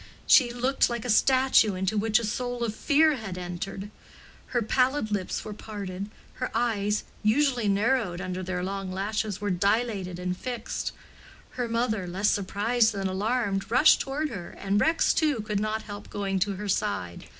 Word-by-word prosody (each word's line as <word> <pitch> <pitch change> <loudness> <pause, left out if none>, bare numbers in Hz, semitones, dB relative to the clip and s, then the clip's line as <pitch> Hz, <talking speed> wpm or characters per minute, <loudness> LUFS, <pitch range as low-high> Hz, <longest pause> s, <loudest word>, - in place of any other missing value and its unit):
She 245 -4 +6
looked 255 +3 +1
like 235 -1 -4
a 245 - +1
statue 255 -4 +4
into 190 +3 -1
which 215 +1 +3
a 235 - -1
soul 245 +2 -2
of 225 -3 -1
Fear 305 +4 +3
had 195 -6 -6
entered: 190 +3 -5 0.6
her 240 -2 0
pallid 255 +1 +1
lips 200 -3 -2
were 215 - -5
parted; 200 -2 -6 0.3
her 255 - 0
eyes, 215 -3 0 0.2
usually 240 +1 +2
narrowed 205 -2 +1
under 185 -1 -4
their 180 -1 -3
long 195 0 -4
lashes, 205 +1 -2
were 205 -1 -1
dilated 200 -1 0
and 180 0 -2
fixed. 240 +3 -4 0.6
Her 245 -2 -3
mother, 230 -5 -1
less 190 +4 +1
surprised 215 +4 +1
than 195 -1 -2
alarmed, 200 +1 -1
rushed 255 +6 +6
toward 295 +3 -2
her, 195 -9 -7
and 200 +2 0
Rex, 325 +1 +3
too, 300 -6 +1
could 210 -1 -2
not 215 +1 -2
help 205 -1 -9
going 195 -1 -2
to 200 +2 0
her 205 +2 -5
side. 185 - -2
210 Hz, 170 wpm, -27 LUFS, 195-240 Hz, 0.6 s, She